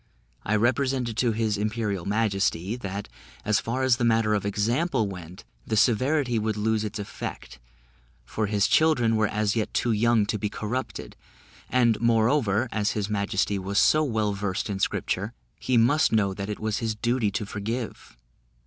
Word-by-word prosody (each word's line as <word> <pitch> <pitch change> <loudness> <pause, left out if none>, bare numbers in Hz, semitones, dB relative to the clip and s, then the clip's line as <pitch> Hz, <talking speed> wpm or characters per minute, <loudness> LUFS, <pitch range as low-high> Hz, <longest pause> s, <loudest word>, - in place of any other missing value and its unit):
I 110 - 0
represented 125 +1 +1
to 120 -1 +2
his 110 -2 -1
imperial 105 -3 -2
majesty, 100 -2 0
that, 100 -3 -5 0.4
as 110 +1 +3
far 125 +3 -2
as 130 -2 +3
the 120 - -2
matter 115 -2 +3
of 100 -1 0
example 115 - 0
went, 90 -2 -9 0.2
the 110 - 0
severity 125 +2 +2
would 110 0 -1
lose 110 0 0
its 105 0 -4
effect; 100 - -7 0.7
for 110 - -2
his 100 0 +2
children 125 -8 +3
were 110 -1 +2
as 105 0 0
yet 110 -2 -1
too 120 - +1
young 115 0 +3
to 105 0 -2
be 105 - -1
corrupted; 115 +5 -5 0.5
and, 115 -3 +2
moreover, 115 0 +2
as 105 -1 0
his 105 0 -3
majesty 100 0 0
was 100 +2 -3
so 155 +7 +5
well 110 -7 0
versed 100 0 -3
in 95 - -3
scripture, - - -1 0.3
he 125 - +1
must 135 +7 +4
know 100 -3 +2
that 100 +1 -5
it 105 - -4
was 110 -1 -1
his 115 -2 -2
duty 120 0 0
to 100 +1 -3
forgive. 110 - -5
110 Hz, 170 wpm, -26 LUFS, 105-120 Hz, 0.7 s, so